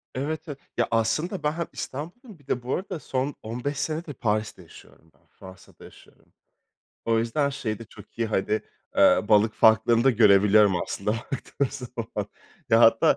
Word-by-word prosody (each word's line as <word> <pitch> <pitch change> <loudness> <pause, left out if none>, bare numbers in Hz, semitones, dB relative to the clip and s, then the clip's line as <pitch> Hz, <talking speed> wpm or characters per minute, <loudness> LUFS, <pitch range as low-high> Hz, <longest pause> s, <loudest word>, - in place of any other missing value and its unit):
Evet, 150 +5 -3
evet, 145 -3 -6 0.2
ya, 120 - +2
aslında 115 - 0
ben 150 - +2
hem 170 +1 -4
İstanbulluyum, 175 - -8
bir 145 - -25
de 125 - -2
bu 125 - -1
arada 185 -3 -5
son 135 0 -3
15 125 +6 -4
senedir 155 +1 -3
Paris'te 105 -4 -2
yaşıyorum 80 -1 -18
ben, - - -33
Fransa'da 95 0 -15
yaşıyorum. - - -18 0.7
O 115 0 +2
yüzden 115 +6 0
şeyde 115 -5 -4
çok 110 - -16
iyi, 115 - +1
hani, 105 0 0 0.4
ııı, 105 - +4
balık 110 +1 +4
farklarını 110 +2 +4
da 135 - +6
görebiliyorum 105 -3 +5
aslında, 100 +2 -3
baktığım 135 +3 -3
zaman. 125 -3 -6 0.4
Ya, - - +5
hatta - - +5
120 Hz, 160 wpm, -25 LUFS, 110-145 Hz, 0.7 s, da